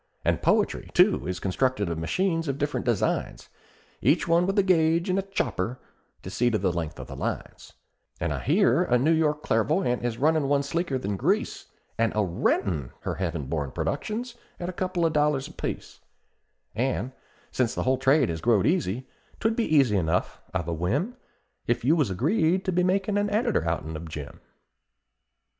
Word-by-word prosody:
And - - +1
poetry, - - +1
too, - - +4
is 90 0 -3
constructed 105 +3 0
by 85 - -1
machines 165 - -1
of 135 -1 -1
different 145 -2 -2
designs, 115 -5 -1 0.5
Each - - +3
one 170 +2 +3
with 195 +2 -1
a 200 - +5
gauge 170 -1 +3
and 190 - +2
a - - +1
chopper 125 - -2 0.5
to 95 - -7
see 120 +4 +2
to 115 - +1
the 95 -3 +1
length 80 -3 -4
of - - -6
the - - -9
lines; - - -5 0.5
And - - -1
I - - -3
hear - - +3
a 125 - +2
New 140 +7 +2
York 150 -2 +1
clairvoyant 125 - +1
is 120 -2 -2
runnin' 155 +1 +2
one 140 0 +2
sleeker 145 0 -1
than 100 -5 -3
grease, - - 0 0.3
And 115 -1 +2
a 105 - +2
rentin' 85 -5 0
her - - -3
heaven 85 -6 -3
born 70 0 -2
productions 235 +3 -3 0.3
at 175 - -3
a - - -5
couple 180 -1 -1
of 160 - +1
dollars 150 -2 +1
apiece; - - -6 0.7
An' 125 +1 -1 0.4
since 120 -3 0
the - - -1
whole 130 0 +1
trade 135 0 +3
has 80 -1 -3
growed 110 0 +3
easy, 130 - 0 0.3
'twould 225 0 +1
be 230 - +1
easy 125 -8 +4
enough, 90 0 -1
I've 90 -3 -2
a 85 - -1
whim, 130 - -1 0.5
If 120 0 0
you 155 +5 +5
was 150 -10 +1
agreed, 160 - +1
to 185 - +1
be 180 0 +2
makin' 195 +2 +1
an 205 0 0
editor 205 - +1
outen 80 -1 -3
of 80 +1 -7
Jim!" 75 -2 -7
130 Hz, 185 wpm, -26 LUFS, -, 0.7 s, a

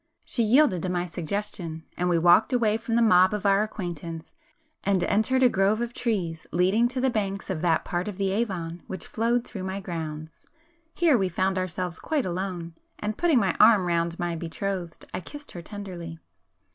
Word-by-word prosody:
She - - -1
yielded 225 - +4
to 185 - -2
my 180 -1 -1
suggestion, 170 -1 -4
and 180 0 0
we 175 - +3
walked 175 +8 +5
away 230 -4 +2
from 230 0 -3
the 235 - +4
mob 185 -2 +5
of 210 - -5
our 200 0 +4
acquaintance, 170 - -5
[p 310 -1 -34
269] 200 0 +3
and 185 - +1
entered 260 +6 +2
a - - +9
grove 200 -1 +2
of 240 0 -3
trees 180 -10 -2
leading 190 +7 +3
to 255 +1 -3
the 260 0 +2
banks 200 -4 -2
of 160 -4 -3
that 165 -2 +2
part 175 +2 -2
of 205 -3 -5
the 195 -1 0
Avon 180 -6 -2
which 190 -3 -5
flowed 235 +2 0
through 195 - -7
my 190 +1 -3
grounds. 160 -4 -6 0.5
Here 320 -8 +4
we 190 -1 +1
found 185 +2 0
ourselves 180 -1 -3
quite 305 -4 -1
alone, 180 -2 -4 0.2
and 210 0 -3
putting 335 -2 +3
my 200 -5 +2
arm 210 -5 +7
round 170 0 0
my 175 -1 -2
betrothed, 175 +1 -4
I - - -2
kissed 290 - -9
her 175 - -7
tenderly. 175 -3 -7
190 Hz, 195 wpm, -26 LUFS, 175-220 Hz, 0.5 s, a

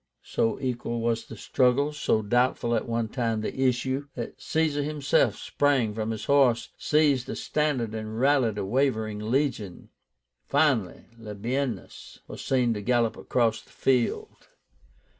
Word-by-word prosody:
So 115 - 0
equal 120 -2 -3
was 115 0 -1
the 115 - -9
struggle, 135 +6 +2
so 110 -7 0
doubtful 120 +2 +1
at 115 - 0
one 115 -1 -1
time 115 -2 -1
the 130 +4 0
issue, 130 +3 -1
that 120 - -6
Caesar 155 -2 0
himself 145 -6 +1
sprang 135 -7 +1
from 110 0 -3
his 110 -2 -4
horse, 135 -5 +3
seized 145 -5 +2
a - - -3
standard, 135 -8 -1
and 110 0 -5
rallied 130 -5 +3
a 100 - -2
wavering 110 -2 0
legion. 110 -4 -2 0.6
Finally, 135 - +1
Labiénus 115 +1 -4
was - - -8
seen 125 -3 +2
to 105 - -4
gallop 120 0 +1
across 115 -3 0
the - - -24
field. 125 -3 -1
120 Hz, 140 wpm, -26 LUFS, 110-135 Hz, 0.6 s, horse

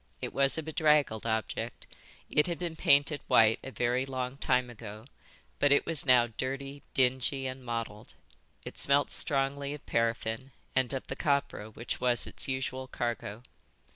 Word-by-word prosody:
It - - -5
was 140 +1 +4
a 160 - -2
bedraggled 150 -8 +2
object; 110 0 -3 0.4
it 150 - +2
had 170 -2 -2
been 170 -2 -4
painted 145 -1 +3
white 110 0 +5
a - - -6
very 125 0 0
long 130 0 -4
time 125 -2 +1
ago, 110 -1 -10 0.5
but 145 - +3
it 145 - +4
was 155 -3 +2
now 125 -2 +6
dirty, 135 +4 -5
dingy, 130 +1 +1
and 130 0 -5
mottled. 115 -3 -5 0.5
It - - -7
smelt 140 +1 +3
strongly 140 0 0
of 150 - -14
paraffin 115 +3 -1 0.2
and 130 -2 +2
of 135 -1 -3
the 135 - -5
copra 140 -7 -1
which 115 +3 -5
was 125 -1 +2
its - - -1
usual 130 0 -3
cargo. 120 -3 -4
130 Hz, 160 wpm, -30 LUFS, 120-140 Hz, 0.5 s, now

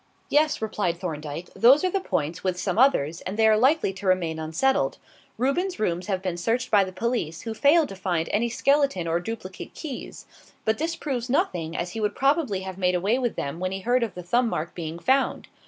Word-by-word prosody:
"Yes," 300 -4 +2
replied 205 -5 -1
Thorndyke. 155 -1 -6
"Those 260 +7 +6
are 370 - +1
the 390 - +1
points 165 - -2
with 185 -1 -1
some 185 +3 -1
others 170 - +3
and 190 +3 -5
they 220 - +4
are 215 - +6
likely 260 -1 +3
to 195 +1 -6
remain 170 -4 +1
unsettled. 160 +13 +1 0.4
Reuben's 350 +9 0
rooms 180 -3 -1
have 190 -2 -1
been 180 -2 -2
searched 230 +7 -1
by 205 -2 +6
the 190 - -5
police, 185 -5 -2
who 225 - -4
failed 295 +6 +4
to 195 - -7
find 175 -3 -1
any 230 +3 +1
skeleton 275 - +1
or 165 +1 +1
duplicate 190 -1 -7
keys; 290 -6 -7 0.4
but 220 0 +1
this 330 +2 -1
proves 255 -6 -3
nothing, 170 - 0
as 175 +1 -3
he 225 - -5
would 210 - 0
probably 275 - +1
have 190 0 -7
made 180 -1 +2
away 200 +8 +1
with 240 -3 -1
them 140 +4 -4
when 185 0 -2
he 190 0 -4
heard 245 +4 +2
of 225 -5 -2
the 180 - -7
thumb 235 +7 +2
mark 165 -3 -3
being 165 -1 -5
found. 265 +9 +1
200 Hz, 215 wpm, -25 LUFS, 175-255 Hz, 0.4 s, Those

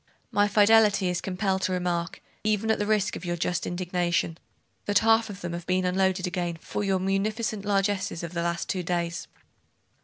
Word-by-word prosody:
'My 205 0 +3
fidelity 210 -2 +5
is 180 -1 -1
compelled 190 0 -1
to 185 - 0
remark, 175 -1 -2 0.2
even 215 +1 +1
at - - 0
the 205 - -1
risk 210 -2 +1
of - - -7
your 175 -1 -2
just 175 +1 -1
indignation, 175 -2 -1 0.5
that 205 - +3
half 225 0 +4
of 200 -1 -8
them 175 -1 -4
have 170 -1 -6
been 185 0 +1
unloaded 185 0 +1
again 175 -2 -2
for 205 - -4
your 195 -1 +1
munificent 205 +3 -1
largesses 195 -3 0
of 170 0 -6
the 170 - -1
last 170 0 -2
two 185 - -1
days. 170 -1 -2
185 Hz, 185 wpm, -27 LUFS, 175-205 Hz, 0.5 s, fidelity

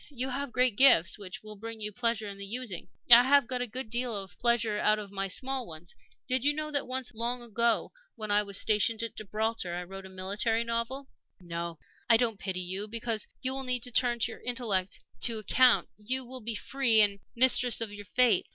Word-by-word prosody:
You 260 -2 -4
have 275 +1 -4
great 250 -4 +1
gifts, 215 -10 +5
which 195 0 -9
will 215 0 -9
bring 225 +2 -8
you 210 0 -4
pleasure 230 -1 -2
in 200 -1 -8
the 200 - -5
using. 225 -5 -5 0.2
I 235 +1 +11
have 275 +1 +4
got 250 +1 -3
a 245 - -1
good 245 0 -6
deal 240 -1 -1
of 195 -2 -7
pleasure 230 -3 +2
out 215 0 +3
of 205 -2 -8
my 195 0 -2
small 260 +5 -1
ones. 165 +1 -10 0.3
Did 255 -1 0
you 290 +1 +3
know 305 0 -4
that 285 -1 0
once, 255 0 -4
long 240 +2 -1
ago, 235 0 0 0.2
when 215 -2 -5
I 205 0 +4
was 200 -1 +2
stationed 220 +1 +1
at 230 - -6
Gibraltar, 215 -3 -3
I 180 - -4
wrote 190 +1 -10
a - - -14
military 200 +5 -2
novel? 235 +4 -3 0.3
"No, 170 -1 -6 0.3
I 230 - +7
don't 225 -4 0
pity 185 -2 -3
you 190 +3 -4
because 225 -1 -3 0.2
you 260 +1 0
will 270 - 0
need 250 -2 0
to 250 - -3
turn 240 0 +2
your 230 - -2
intellect 220 -7 -1 0.2
to 230 -2 +1
account. 245 +4 +3
You 255 +5 -2
will 255 +1 -7
be 225 0 -3
free, 245 -1 +2
and 200 -1 +2 0.2
mistress 250 0 +5
of 225 -3 -2
your 205 0 -9
fate. 235 -2 +3
230 Hz, 215 wpm, -29 LUFS, 205-250 Hz, 0.3 s, I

